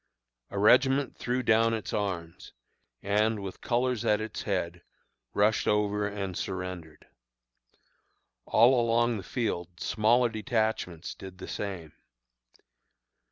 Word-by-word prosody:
A 100 - -6
regiment 130 +6 +4
threw 125 +1 -2
down 115 0 +3
its 110 - -5
arms, 85 -5 -4 0.5
and, 105 +2 +1
with 95 -2 -7
colors 125 -1 0
at 105 0 +2
its 110 -1 -5
head, 90 -3 -2 0.5
rushed 105 +2 +2
over 105 0 +1
and 100 -3 -4
surrendered. 90 -5 -6 1.4
All 120 +2 +5
along 120 0 +2
the - - -5
field 90 -5 -3
smaller 120 +3 +2
detachments 110 -7 -2
did 95 -1 -11
the 95 - -8
same. 90 -7 -5
105 Hz, 115 wpm, -28 LUFS, 95-115 Hz, 1.4 s, All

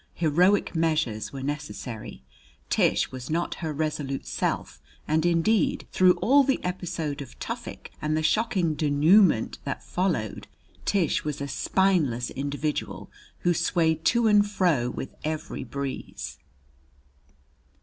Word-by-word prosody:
Heroic 175 +5 +3
measures 155 -10 0
were 135 -1 -6
necessary: 120 - -6 0.5
Tish - - +2
was 130 -1 -7
not 170 +2 -1
her 160 -2 -2
resolute 150 -2 -3
self; 65 - -2 0.3
and, 160 +2 +2
indeed, 175 +6 +2
through 185 -1 +5
all 265 +10 +4
the 270 0 +1
episode 175 -5 -3
of 135 - -10
Tufik, - - -6
and 155 0 0
the 155 - -1
shocking 195 -4 +1
denouement 150 - +4
that - - -4
followed, 175 - -2 0.4
Tish 190 -6 +1
was 150 -2 -3
a 140 - -3
spineless 140 -5 +1
individual 145 +2 -3 0.3
who 175 - +3
swayed 165 -2 +1
to 235 -1 +3
and 205 -1 +5
fro 170 -12 +1
with 130 - -6
every 155 -2 -4
breeze. 130 - -6
155 Hz, 125 wpm, -26 LUFS, 140-180 Hz, 0.5 s, through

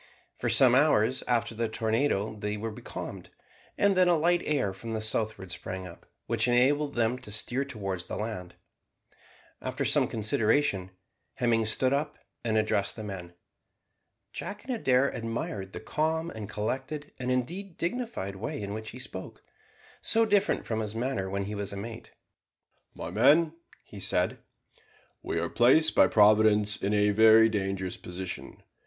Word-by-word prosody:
For - - -1
some 125 -2 +6
hours 130 -3 +3
after 120 -1 +1
the 115 0 -2
tornado 110 -1 0
they 105 0 -3
were 110 +2 -4
becalmed, 105 - -8 0.5
and 200 -1 +3
then 185 -1 +5
a 175 -1 +4
light 175 +3 +3
air 135 -10 0
from 115 +4 -7
the 110 - -1
southward 110 -3 -1
sprang 95 +1 -5
up, 85 -2 -12 0.2
which 115 +1 0
enabled 140 +4 +2
them 120 +1 +1
to 105 - -9
steer 120 +5 -1
towards 95 -9 -5
the - - -4
land. 105 -5 -5 1.1
After - - -3
some - - +3
consideration, 110 -1 +1 0.5
Hemming 115 -2 +1
stood 130 +4 +2
up 145 +2 -1 0.3
and 110 -2 +1
addressed 100 -2 +1
the 110 - -7
men. 90 -4 -7 1.0
Jack 205 0 -6
and 260 - -2
Adair 135 - +2
admired 115 -4 -4
the - - -7
calm 160 +7 -1
and 110 -2 -7
collected, 135 +8 -4
and, 125 0 -3
indeed, 170 +9 -2
dignified 175 - -3
way 145 +9 -4
in 100 -1 -4
which 110 +1 -6
he 125 - -9
spoke, 95 -7 -8 0.6
so 225 0 +2
different 205 -2 +1
to 110 -1 -2
his 110 0 -4
manner 115 -5 -2
when 100 +1 -2
he 105 +2 -5
was 100 -1 -3
a 100 - -6
mate. 115 +3 -7 0.9
"My - - -6
men," 150 +8 +4 0.3
he - - -11
said, - - 0 0.8
"we - - -2
are - - -1
placed 130 +7 +4
by - - +6
Providence 105 -1 +4
in 100 - -2
a 105 0 +3
very 110 +1 +7
dangerous 95 -3 -2
position. 90 0 -7
110 Hz, 160 wpm, -28 LUFS, 105-140 Hz, 1.1 s, very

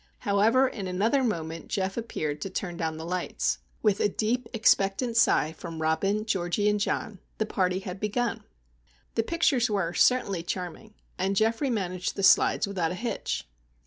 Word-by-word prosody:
However, 225 +5 +3
in 205 -7 -5
another 220 +9 +1
moment 165 -7 -3
Geof 190 0 -2
appeared 155 -10 -3
to 195 - -3
turn 180 -2 -4
down 160 -2 -2
the 160 - -6
lights. 180 +1 -1 0.2
With 210 -3 +3
a 205 - +3
deep, 230 +4 -1
expectant 225 +1 +2
sigh 220 -8 +4
from 165 0 -8
Robin, 195 +7 0
Georgie, 195 -1 0
and 210 0 +2
John, 205 0 -2 0.2
the 220 - 0
party 185 -2 0
had 190 0 -6
begun! 225 +3 -1 0.7
The 225 - +2
pictures 270 -3 +2
were 190 -5 0
certainly 200 -8 +3
charming, 180 +5 -6 0.2
and 190 +2 0
Geoffrey 225 +7 +1
managed 185 -5 -2
the 195 - -3
slides 200 - +5
without 180 -5 -1
a 180 - -4
hitch. 235 +5 -3
200 Hz, 165 wpm, -27 LUFS, 180-225 Hz, 0.7 s, slides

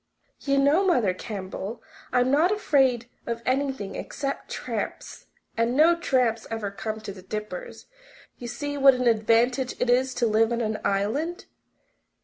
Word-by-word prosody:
"You 275 -1 0
know, 285 +7 +4
Mother 245 - +2
Campbell, 195 +2 -6 0.3
I'm 250 +1 +2
not 315 +7 +4
afraid 270 - +2 0.2
of 235 0 -3
anything 260 -7 -1
except 275 0 -5
tramps. - - -5 0.3
And 230 +2 +1
no 330 +3 +6
tramps 255 -8 0
ever 225 -3 -3
come 220 +2 -5
to 215 -2 -6
the 190 - -12
Dippers. 215 - -6 0.5
You 240 - -6
see 290 +3 -4
what 270 -1 +7
an 250 0 -1
advantage 235 +3 +2
it 250 0 +2
is 255 +1 +2
to 240 - +1
live 225 +1 +3
on 235 0 0
an 215 -1 -2
island! 240 - -1
245 Hz, 150 wpm, -25 LUFS, 220-275 Hz, 0.5 s, what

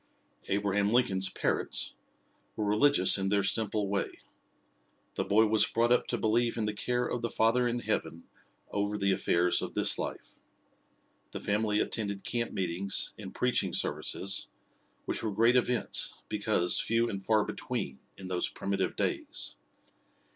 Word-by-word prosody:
Abraham 100 +1 0
Lincoln's 95 -6 +2
parents - - 0 0.6
were 105 - -2
religious 105 -1 +4
in 95 0 -1
their 100 0 +2
simple 105 0 +2
way. 100 0 -1 1.0
The - - -2
boy 110 +2 +3
was 110 0 +3
brought 120 +1 +1
up 125 - +3
to 120 - -1
believe 115 +2 +1
in 110 - -1
the 105 - -2
care 125 +4 -1
of 120 - -3
the 120 - -2
Father 120 +3 +2
in 120 0 -2
Heaven 85 -6 -3 0.5
over 100 +1 -1
the 100 -1 +1
affairs 90 -2 +2
of - - -6
this - - +2
life. - - -6 0.9
The - - -4
family 105 0 0
attended 100 -3 -2
camp 120 -1 -1
meetings 95 +1 0
and - - -8
preaching - - 0
services, 100 0 +1 0.6
which - - -2
were 110 - -2
great 115 +4 +3
events, 125 -1 +1
because 105 -4 +1
few 115 +1 +1
and 100 -4 -4
far 110 0 +2
between, 65 0 -5 0.2
in 95 - -9
those 90 -1 0
primitive 100 0 -2
days. - - -2
105 Hz, 150 wpm, -30 LUFS, 100-115 Hz, 1.0 s, religious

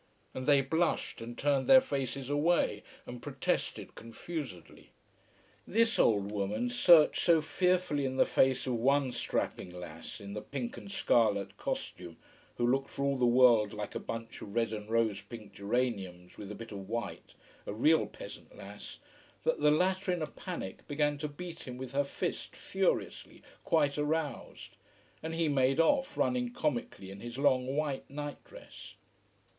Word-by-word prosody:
And 130 0 -5
they 140 -2 +6
blushed 160 -1 0
and 120 +1 -7
turned 140 -2 +1
their 265 - +9
faces 135 - -3
away 145 -7 +2 0.2
and 120 0 -8
protested 135 -1 -2
confusedly. 115 - -8 0.8
This 230 +2 +2
old 100 -2 +3
woman 105 +4 -1
searched 155 +5 +6
so 170 -2 +5
fearfully 180 -3 +1
in 130 -1 -2
the - - +5
face 130 -1 +2
of 130 - -1
one 135 +2 +2
strapping 95 - -2
lass 90 -2 -9
in 100 0 -8
the 105 - -4
pink 240 - -5
and 200 - -9
scarlet 105 - +2
costume, 85 -2 -5 0.4
who 120 - +1
looked 135 +3 +1
for 140 - -3
all 140 0 +2
the 125 -2 +2
world 120 -4 +5
like 105 0 -5
a - - -3
bunch 115 0 -6
of 100 - -9
red 115 -1 +1
and 105 0 -6
rose 115 -3 +1
pink 110 -4 -11
geraniums, 100 -5 -2
with 105 0 -8
a - - -6
bit 115 +1 -9
of 100 -1 -8
white, 120 +1 -5 0.3
a - - -2
real 155 +8 +4
peasant - - -11
lass - - -9 0.5
that 485 - +1
the 150 - +4
latter 185 +4 +2
in 175 -3 -1
a - - +1
panic 160 - -7
began 145 0 0
to 150 - -2
beat 170 +2 -8
him 125 -1 -6
with 130 -1 -6
her 140 +1 +2
fist, 140 - -4
furiously, - - -2 0.2
quite 150 -4 +2
aroused. 150 0 -3 0.4
And 160 +1 -4
he 165 -1 +1
made 135 0 +2
off, 270 - +2
running 245 -1 +1
comically 120 - -3
in 100 - -9
his 120 +3 -7
long 130 -1 +2
white 145 -3 -2
nightdress. 145 +1 -9
135 Hz, 165 wpm, -31 LUFS, 115-155 Hz, 0.8 s, their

